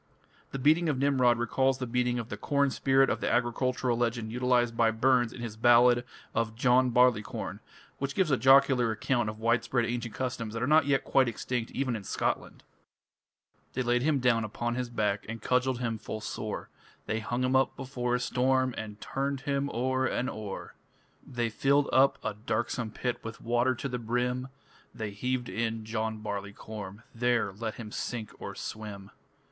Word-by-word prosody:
The -, -, -5 dB
beating 155 Hz, +5 st, +3 dB
of 145 Hz, -, 0 dB
Nimrod 130 Hz, -3 st, +3 dB
recalls 130 Hz, +3 st, +1 dB
the 130 Hz, -, -3 dB
beating 125 Hz, 0 st, 0 dB
of 120 Hz, -1 st, -4 dB
the -, -, -4 dB
corn 140 Hz, -2 st, +1 dB
spirit 135 Hz, +1 st, +3 dB
of -, -, -2 dB
the -, -, 0 dB
agricultural 125 Hz, +1 st, +1 dB
legend 115 Hz, -2 st, -1 dB
utilized 125 Hz, -1 st, +1 dB
by 115 Hz, -1 st, +4 dB
Burns 120 Hz, +1 st, +2 dB
in 120 Hz, -, -9 dB
his 115 Hz, -3 st, -5 dB
ballad 120 Hz, +1 st, +5 dB, 0.3 s
of 110 Hz, -1 st, -1 dB
"John 125 Hz, +1 st, +4 dB
Barleycorn", 120 Hz, -3 st, +1 dB, 0.4 s
which 140 Hz, 0 st, -3 dB
gives 185 Hz, -6 st, +2 dB
a 130 Hz, -, +4 dB
jocular 135 Hz, -2 st, +5 dB
account 110 Hz, +1 st, 0 dB
of 105 Hz, -, -7 dB
widespread 115 Hz, +2 st, +1 dB
ancient 120 Hz, -1 st, -3 dB
customs 115 Hz, -4 st, -3 dB
that 115 Hz, -, -2 dB
are -, -, +3 dB
not 150 Hz, +1 st, +4 dB
yet 135 Hz, -1 st, +2 dB
quite 135 Hz, -2 st, +3 dB
extinct 120 Hz, +1 st, -3 dB
even 130 Hz, -3 st, -1 dB
in 105 Hz, -, -6 dB
Scotland: -, -, -2 dB, 1.1 s
They 130 Hz, -, -1 dB
laid 120 Hz, 0 st, +2 dB
him 150 Hz, +1 st, +2 dB
down 125 Hz, -3 st, +2 dB
upon 120 Hz, +2 st, -3 dB
his 125 Hz, 0 st, -3 dB
back 105 Hz, -3 st, 0 dB
And 115 Hz, 0 st, -5 dB
cudgelled 125 Hz, +3 st, +1 dB
him 115 Hz, -2 st, -2 dB
full 110 Hz, -, -5 dB
sore; 105 Hz, 0 st, -5 dB, 0.4 s
They 110 Hz, -, -1 dB
hung 120 Hz, +3 st, -2 dB
him 130 Hz, +1 st, +1 dB
up 130 Hz, 0 st, +3 dB
before 125 Hz, -2 st, -2 dB
a -, -, 0 dB
storm 130 Hz, +1 st, +1 dB
And 105 Hz, -1 st, -7 dB
turned 135 Hz, +2 st, -2 dB
him 140 Hz, 0 st, -1 dB
o'er 130 Hz, +1 st, 0 dB
and 125 Hz, +2 st, -1 dB
o'er. 105 Hz, -3 st, -7 dB, 0.5 s
They 120 Hz, -3 st, -2 dB
filled 140 Hz, +6 st, +2 dB
up 135 Hz, +1 st, +5 dB
a -, -, -2 dB
darksome 110 Hz, +2 st, -2 dB
pit 120 Hz, +2 st, -3 dB
With 115 Hz, 0 st, -7 dB
water 120 Hz, +2 st, +1 dB
to 135 Hz, -, -4 dB
the 125 Hz, -2 st, -3 dB
brim, 125 Hz, +2 st, -1 dB, 0.5 s
They 110 Hz, -2 st, -4 dB
heaved 125 Hz, +4 st, -2 dB
in 115 Hz, -1 st, -2 dB
John 110 Hz, -1 st, -3 dB
Barleycorn 100 Hz, 0 st, -6 dB
There 120 Hz, -4 st, +1 dB
let 110 Hz, +2 st, -4 dB
him 110 Hz, -3 st, -8 dB
sink 115 Hz, -2 st, -4 dB
or -, -, -6 dB
swim. 105 Hz, -3 st, -7 dB
120 Hz, 180 wpm, -29 LUFS, 110-130 Hz, 1.1 s, ballad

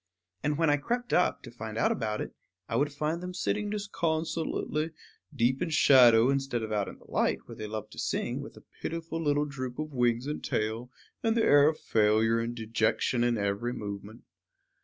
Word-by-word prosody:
And 145 Hz, +1 st, 0 dB
when 165 Hz, -2 st, +3 dB
I 145 Hz, -, +3 dB
crept 240 Hz, -, -2 dB
up, 180 Hz, -, +2 dB
to 120 Hz, -, -9 dB
find 110 Hz, -2 st, -7 dB
out 115 Hz, -, +3 dB
about 110 Hz, -3 st, -2 dB
it, -, -, -6 dB, 0.3 s
I -, -, -3 dB
would 145 Hz, +4 st, +2 dB
find 155 Hz, +4 st, -2 dB
them 180 Hz, 0 st, -6 dB
sitting 210 Hz, +3 st, -1 dB
disconsolately, 165 Hz, -5 st, -2 dB, 0.4 s
deep 130 Hz, -1 st, +1 dB
in -, -, 0 dB
shadow, 125 Hz, -5 st, +6 dB
instead 135 Hz, -4 st, -1 dB
of 110 Hz, -, -5 dB
out 105 Hz, -2 st, 0 dB
in -, -, -9 dB
the -, -, -20 dB
light -, -, 0 dB
where -, -, -10 dB
they 110 Hz, -, -6 dB
love 110 Hz, 0 st, -6 dB
to -, -, -10 dB
sing, -, -, -2 dB
with -, -, -10 dB
a -, -, -14 dB, 0.2 s
pitiful 165 Hz, 0 st, -4 dB
little 145 Hz, -1 st, +2 dB
droop 130 Hz, -3 st, -6 dB
of 155 Hz, -1 st, -4 dB
wings 120 Hz, -1 st, +1 dB
and 150 Hz, +1 st, -4 dB
tail, 110 Hz, +3 st, -2 dB, 0.3 s
and 225 Hz, 0 st, +1 dB
the 225 Hz, -, +3 dB
air 145 Hz, 0 st, +6 dB
of 155 Hz, -, -3 dB
failure 110 Hz, +1 st, +3 dB
and 115 Hz, +1 st, -3 dB
dejection 115 Hz, +2 st, 0 dB
in 120 Hz, -1 st, +2 dB
every 100 Hz, +4 st, -1 dB
movement. 100 Hz, +1 st, -7 dB
130 Hz, 200 wpm, -29 LUFS, 115-155 Hz, 0.4 s, shadow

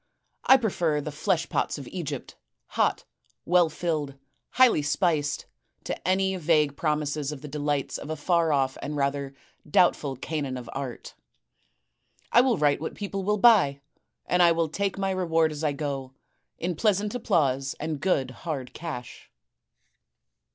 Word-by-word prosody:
I 265 Hz, -, +8 dB
prefer 175 Hz, -, 0 dB
the 150 Hz, +1 st, -5 dB
flesh 165 Hz, +3 st, 0 dB
pots -, -, -1 dB
of 140 Hz, -3 st, -8 dB
Egypt, 175 Hz, -6 st, -5 dB, 0.3 s
hot, -, -, 0 dB, 0.4 s
well 175 Hz, -1 st, +4 dB
filled, 155 Hz, -4 st, -2 dB, 0.4 s
highly 255 Hz, -11 st, +5 dB
spiced, 145 Hz, -1 st, 0 dB, 0.4 s
to -, -, -5 dB
any 190 Hz, +1 st, +2 dB
vague 150 Hz, -4 st, +2 dB
promises 150 Hz, -1 st, -1 dB
of 145 Hz, -3 st, -8 dB
the 150 Hz, -, -8 dB
delights 145 Hz, -1 st, -2 dB
of -, -, -8 dB
a 155 Hz, -, -2 dB
far 165 Hz, +1 st, +1 dB
off 135 Hz, -2 st, 0 dB
and 150 Hz, -, -4 dB
rather 140 Hz, -1 st, -1 dB, 0.3 s
doubtful 145 Hz, -4 st, +3 dB
Canaan 140 Hz, -1 st, -3 dB
of 125 Hz, -, -8 dB
art. 135 Hz, -3 st, -6 dB, 1.2 s
I 240 Hz, -, +7 dB
will 250 Hz, -4 st, +2 dB
write 145 Hz, -1 st, +2 dB
what 160 Hz, -, -4 dB
people 195 Hz, -1 st, -4 dB
will 210 Hz, +2 st, +1 dB
buy; 195 Hz, -11 st, +5 dB, 0.5 s
and 180 Hz, -, +2 dB
I 170 Hz, -1 st, +6 dB
will 165 Hz, -1 st, 0 dB
take 195 Hz, +4 st, -2 dB
my 195 Hz, 0 st, 0 dB
reward 165 Hz, -4 st, +1 dB
as 150 Hz, +1 st, -6 dB
I 150 Hz, -, +2 dB
go, 140 Hz, -2 st, -4 dB, 0.4 s
in 175 Hz, +1 st, -2 dB
pleasant 210 Hz, +2 st, +1 dB
applause 140 Hz, -, 0 dB
and 155 Hz, -1 st, -3 dB
good 135 Hz, -9 st, +1 dB
hard 140 Hz, -3 st, -5 dB
cash. 150 Hz, -7 st, -7 dB
155 Hz, 150 wpm, -26 LUFS, 140-180 Hz, 1.2 s, I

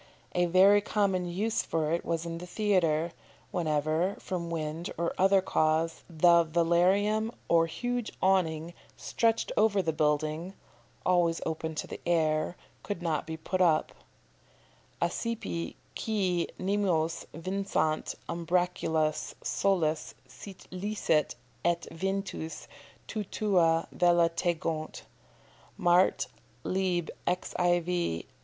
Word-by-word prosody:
A 175 Hz, 0 st, +2 dB
very 195 Hz, +4 st, +6 dB
common 195 Hz, -4 st, 0 dB
use 210 Hz, +6 st, 0 dB
for 155 Hz, -1 st, -1 dB
it 170 Hz, -, 0 dB
was 165 Hz, 0 st, -2 dB
in 165 Hz, 0 st, -4 dB
the 180 Hz, -, -8 dB
theatre, 175 Hz, -5 st, +1 dB, 0.4 s
whenever, 155 Hz, +2 st, 0 dB
from 170 Hz, -2 st, -4 dB
wind 160 Hz, +1 st, -3 dB
or 170 Hz, 0 st, -1 dB
other 190 Hz, 0 st, +4 dB
cause, 160 Hz, -1 st, +1 dB
the 170 Hz, +1 st, +5 dB
velarium 185 Hz, +7 st, +2 dB, 0.2 s
or 165 Hz, -1 st, +4 dB
huge 245 Hz, +6 st, -3 dB
awning 170 Hz, -3 st, +1 dB, 0.2 s
stretched 230 Hz, -1 st, 0 dB
over 210 Hz, -2 st, +3 dB
the 165 Hz, -4 st, 0 dB
building 155 Hz, +4 st, 0 dB, 0.5 s
(always 175 Hz, -2 st, +3 dB
open 160 Hz, 0 st, -3 dB
to -, -, -3 dB
the -, -, -8 dB
air) 160 Hz, 0 st, +1 dB, 0.2 s
could 190 Hz, -4 st, -5 dB
not 160 Hz, -3 st, -1 dB
be 160 Hz, 0 st, -4 dB
put 185 Hz, +3 st, -2 dB
up: 160 Hz, -4 st, +3 dB, 1.1 s
"Accipe 225 Hz, -7 st, -3 dB, 0.2 s
quæ 185 Hz, -6 st, 0 dB
nimios 185 Hz, -5 st, 0 dB
vincant 165 Hz, -3 st, -1 dB
umbracula 170 Hz, -2 st, 0 dB, 0.3 s
soles, 170 Hz, -6 st, 0 dB
Sit 195 Hz, -2 st, -12 dB
licet, 185 Hz, -5 st, 0 dB, 0.3 s
et 170 Hz, 0 st, +1 dB
ventus, 190 Hz, -2 st, -4 dB, 0.4 s
te 215 Hz, -1 st, -3 dB
tua 175 Hz, -6 st, +2 dB
vela 175 Hz, -1 st, +4 dB
tegont." 165 Hz, -2 st, -2 dB, 0.7 s
Mart., 180 Hz, -1 st, +3 dB, 0.4 s
lib. 185 Hz, -3 st, 0 dB, 0.2 s
xiv. 175 Hz, -, 0 dB
175 Hz, 110 wpm, -29 LUFS, 160-190 Hz, 1.1 s, very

